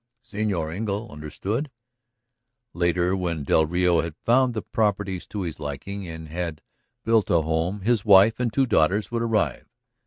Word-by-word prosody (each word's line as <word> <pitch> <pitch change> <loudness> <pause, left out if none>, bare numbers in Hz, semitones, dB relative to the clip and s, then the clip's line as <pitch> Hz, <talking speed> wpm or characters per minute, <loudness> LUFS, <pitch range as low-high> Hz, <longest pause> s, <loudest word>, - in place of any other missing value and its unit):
Señor 100 -8 -2
Engle 105 +2 -3
understood?... 95 - -4 1.0
Later, 85 +1 +1
when 85 -5 -2
del 80 +3 +3
Rio 90 0 +2
had 85 -2 -6
found 125 +1 +3
the 110 - -3
properties 100 -4 -1
to 105 - -5
his 85 -4 -5
liking 95 +7 -6
and 80 -1 -8
had 85 -1 -5 0.4
builded 110 -3 +3
a 85 - +4
home, 80 +5 -1
his 110 +1 +1
wife 105 +2 +6
and 120 -2 0
two 135 +4 +2
daughters 100 -1 +1
would 115 -1 -1
arrive. 105 - 0
95 Hz, 155 wpm, -24 LUFS, 85-110 Hz, 1.0 s, wife